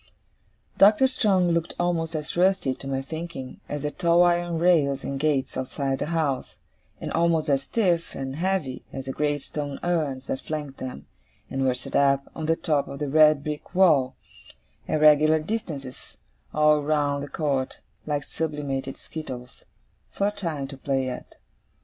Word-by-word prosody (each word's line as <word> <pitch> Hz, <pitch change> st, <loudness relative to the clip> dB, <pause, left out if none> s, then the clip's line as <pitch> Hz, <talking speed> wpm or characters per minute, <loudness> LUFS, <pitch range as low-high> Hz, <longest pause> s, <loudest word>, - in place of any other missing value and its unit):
Doctor 210 Hz, +6 st, +7 dB
Strong 195 Hz, -9 st, +2 dB
looked 170 Hz, 0 st, -1 dB
almost 170 Hz, -2 st, 0 dB
as 150 Hz, -1 st, -4 dB
rusty, 185 Hz, -6 st, +2 dB
to 135 Hz, -, -9 dB
my 135 Hz, 0 st, -2 dB
thinking, 160 Hz, -3 st, -7 dB
as 145 Hz, -1 st, -4 dB
the 150 Hz, -, -1 dB
tall 170 Hz, +1 st, +4 dB
iron 175 Hz, -1 st, +2 dB
rails 155 Hz, -6 st, +3 dB
and 135 Hz, 0 st, -3 dB
gates 145 Hz, -3 st, 0 dB
outside 135 Hz, +1 st, -2 dB
the -, -, -2 dB
house; 155 Hz, -6 st, -1 dB, 0.4 s
and -, -, -5 dB
almost 165 Hz, -2 st, +2 dB
as 135 Hz, -1 st, +3 dB
stiff 175 Hz, -1 st, 0 dB
and 135 Hz, +1 st, -4 dB
heavy 180 Hz, -7 st, -1 dB
as 135 Hz, -1 st, -6 dB
the 135 Hz, -, -3 dB
great 145 Hz, 0 st, -1 dB
stone 145 Hz, -2 st, -5 dB
urns 150 Hz, -7 st, -1 dB
that 130 Hz, -, -3 dB
flanked 150 Hz, -3 st, -5 dB
them, 125 Hz, -, -6 dB, 0.5 s
and 135 Hz, 0 st, -1 dB
were 130 Hz, -1 st, +2 dB
set 125 Hz, -, -7 dB
up, 140 Hz, -1 st, +4 dB
on 160 Hz, -1 st, -4 dB
the 165 Hz, -, +3 dB
top 150 Hz, -4 st, 0 dB
of 140 Hz, -, -7 dB
the 145 Hz, 0 st, -3 dB
red 155 Hz, -1 st, +5 dB
brick 150 Hz, +4 st, -6 dB
wall, 155 Hz, -9 st, +4 dB, 0.7 s
at 155 Hz, -, 0 dB
regular 155 Hz, +1 st, +6 dB
distances 155 Hz, -, -5 dB, 0.3 s
all 150 Hz, 0 st, +4 dB
round 145 Hz, -1 st, +1 dB
the -, -, -5 dB
court, 140 Hz, -4 st, -1 dB, 0.3 s
like 145 Hz, -2 st, -1 dB
sublimated 140 Hz, -4 st, -3 dB
skittles, 130 Hz, -6 st, -8 dB, 0.5 s
for 200 Hz, +1 st, 0 dB
Time 165 Hz, -9 st, -3 dB
to 135 Hz, 0 st, -9 dB
play 135 Hz, -1 st, -1 dB
at. 125 Hz, -, -8 dB
150 Hz, 165 wpm, -25 LUFS, 135-170 Hz, 0.7 s, Doctor